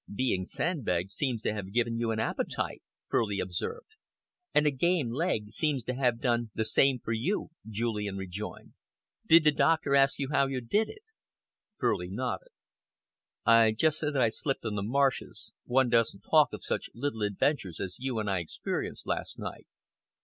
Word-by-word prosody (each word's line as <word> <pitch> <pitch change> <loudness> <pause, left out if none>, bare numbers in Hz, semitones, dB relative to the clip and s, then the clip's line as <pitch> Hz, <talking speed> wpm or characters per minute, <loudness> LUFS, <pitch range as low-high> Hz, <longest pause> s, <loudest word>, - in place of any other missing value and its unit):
"Being 100 -4 0
sandbagged 100 - -1
seems 120 -2 -1
to - - 0
have 100 -2 -5
given 115 +1 0
you 115 -1 0
an 110 -1 -1
appetite," 110 - -2 0.3
Furley 105 -3 0
observed. 90 - -4 0.6
"And 150 - +3
a 150 - +4
game 150 -2 +1
leg 120 - -1
seems 145 -3 0
to 125 - -3
have 125 -3 +1
done 120 -2 +1
the 110 - 0
same 135 +4 +4
for 115 - -6
you," 120 - -1 0.2
Julian 105 -2 -2
rejoined. 95 +2 -7 0.5
"Did 165 0 +8
the 150 - +6
doctor 155 -1 +2
ask 135 0 +5
you 135 -2 -2
how 140 -1 +3
you 135 -1 -2
did 205 - +1
it?" 425 0 -11 0.7
Furley - - 0
nodded. - - -3 1.0
"I 115 -1 +6
just 155 +7 +2
said 150 -1 -1
that 130 - +4
I 115 - +4
slipped 135 +3 -2
on 110 - -1
the 105 - -2
marshes. 135 +6 0
One 130 0 +3
doesn't 115 -1 +2
talk - - +4
of - - -8
such - - -2
little 120 -2 -3
adventures 100 - 0
as 95 -1 -4
you 130 -2 -2
and 110 -1 -1
I 95 -2 +1
experienced 85 - -4
last - - -3
night." - - -7
120 Hz, 175 wpm, -29 LUFS, 105-140 Hz, 1.0 s, Did